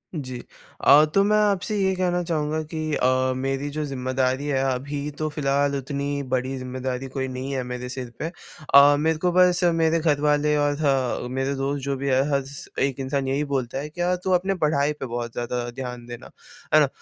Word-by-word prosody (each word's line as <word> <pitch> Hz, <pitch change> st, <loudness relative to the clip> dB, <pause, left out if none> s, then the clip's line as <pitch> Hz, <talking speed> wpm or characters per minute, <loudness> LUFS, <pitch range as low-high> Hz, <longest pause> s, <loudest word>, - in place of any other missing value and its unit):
जी। 130 Hz, -5 st, -5 dB, 0.4 s
अ, 150 Hz, +2 st, +7 dB
तो 195 Hz, -, +5 dB
मैं 210 Hz, +1 st, +3 dB
आपसे 210 Hz, 0 st, +1 dB
ये 190 Hz, -1 st, +2 dB
कहना 180 Hz, -1 st, 0 dB
चाहूँगा 155 Hz, -2 st, -1 dB
कि 155 Hz, -1 st, -3 dB
अ, 130 Hz, 0 st, +2 dB
मेरी 135 Hz, +2 st, -2 dB
जो 150 Hz, +1 st, -3 dB
ज़िम्मेदारी 130 Hz, 0 st, -1 dB
है 135 Hz, -2 st, +1 dB
अभी 145 Hz, +3 st, -4 dB
तो 155 Hz, -, -1 dB
फ़िलहाल 140 Hz, -1 st, 0 dB
उतनी 140 Hz, +1 st, -3 dB
बड़ी 130 Hz, +1 st, 0 dB
ज़िम्मेदारी 130 Hz, 0 st, -4 dB
कोई 130 Hz, 0 st, -3 dB
नहीं 130 Hz, +1 st, -5 dB
है 130 Hz, -1 st, -1 dB
मेरे 125 Hz, 0 st, -5 dB
सिर 125 Hz, -1 st, -5 dB
पे। -, -, -2 dB, 0.5 s
अ, 140 Hz, +1 st, +8 dB
मेरे 160 Hz, +1 st, +1 dB
को 180 Hz, +3 st, +1 dB
बस 180 Hz, 0 st, +4 dB
मेरे 165 Hz, 0 st, +2 dB
घर 150 Hz, -3 st, +1 dB
वाले 150 Hz, 0 st, +2 dB
और 145 Hz, 0 st, +1 dB
ह 135 Hz, -4 st, +1 dB
मेरे 135 Hz, +1 st, -1 dB
दोस्त 140 Hz, +1 st, -2 dB
जो 140 Hz, 0 st, -1 dB
भी 140 Hz, +1 st, -3 dB
है, 130 Hz, 0 st, +4 dB
हर 140 Hz, -1 st, +1 dB, 0.4 s
एक 135 Hz, -1 st, 0 dB
इंसान 135 Hz, 0 st, -1 dB
यही 135 Hz, +2 st, 0 dB
बोलता 135 Hz, -4 st, -2 dB
है 150 Hz, +2 st, -5 dB
कि 175 Hz, +3 st, -7 dB
यार 180 Hz, +1 st, +2 dB
तू 190 Hz, -, 0 dB
अपनी 185 Hz, +2 st, +2 dB
पढ़ाई 150 Hz, -1 st, +2 dB
पे 145 Hz, -, -6 dB
बहुत 120 Hz, -1 st, -4 dB
ज़्यादा 120 Hz, 0 st, -3 dB
ध्यान 125 Hz, -1 st, -6 dB
देना 120 Hz, +1 st, -10 dB, 0.4 s
है 155 Hz, -, +8 dB
ना। 150 Hz, -, +4 dB
140 Hz, 205 wpm, -24 LUFS, 130-155 Hz, 0.5 s, अ